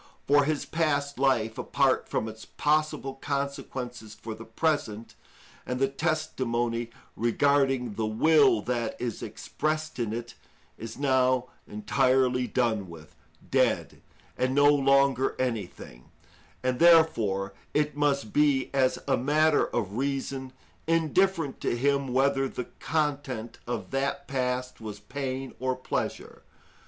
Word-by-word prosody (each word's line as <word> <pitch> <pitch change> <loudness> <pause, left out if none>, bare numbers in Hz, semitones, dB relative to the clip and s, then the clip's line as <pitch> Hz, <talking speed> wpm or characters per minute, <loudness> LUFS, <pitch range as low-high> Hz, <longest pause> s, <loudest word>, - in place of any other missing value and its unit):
For 145 0 +4
his 155 -1 -1
past 145 -4 -1
life, 120 -5 +1
apart - - +1
from 110 - -1
its 110 0 -9
possible 150 -2 0
consequences 135 -5 -4
for 110 0 -7
the 115 +1 -10
present, 115 -3 -1 0.5
and 125 0 -3
the 135 - +3
testimony 130 -6 -1 0.3
regarding 135 0 +2
the 110 +1 -2
will 135 0 +4
that 120 -2 -2
is 120 -3 -3
expressed 155 -1 -3
in 115 -3 -1
it, 120 +1 -5 0.4
is 110 0 -8
now 130 -2 +2 0.2
entirely 125 +3 +1
done 110 -7 0
with, 80 -2 -12 0.4
dead, - - +1 0.4
and 130 +1 +1
no 145 0 +5
longer 135 -2 +3
anything; 110 - -4 0.6
and, 125 -1 0
therefore, 115 - +4 0.2
it 150 -1 +1
must 140 -6 0
be, 145 -3 +2
as 130 -2 +2
a - - +3
matter 150 +4 +3
of 105 -2 -3
reason, 135 -1 -2 0.4
indifferent 165 -1 +1
to 120 - 0
him 140 +2 +1
whether 135 +1 +2
the 125 - -5
content 140 -7 -2
of 120 - -4
that 135 +1 -2
past 125 -2 -2
was 105 -2 -7
pain 135 -1 -5
or 130 0 0
pleasure. 130 - -4
130 Hz, 125 wpm, -27 LUFS, 120-140 Hz, 0.6 s, no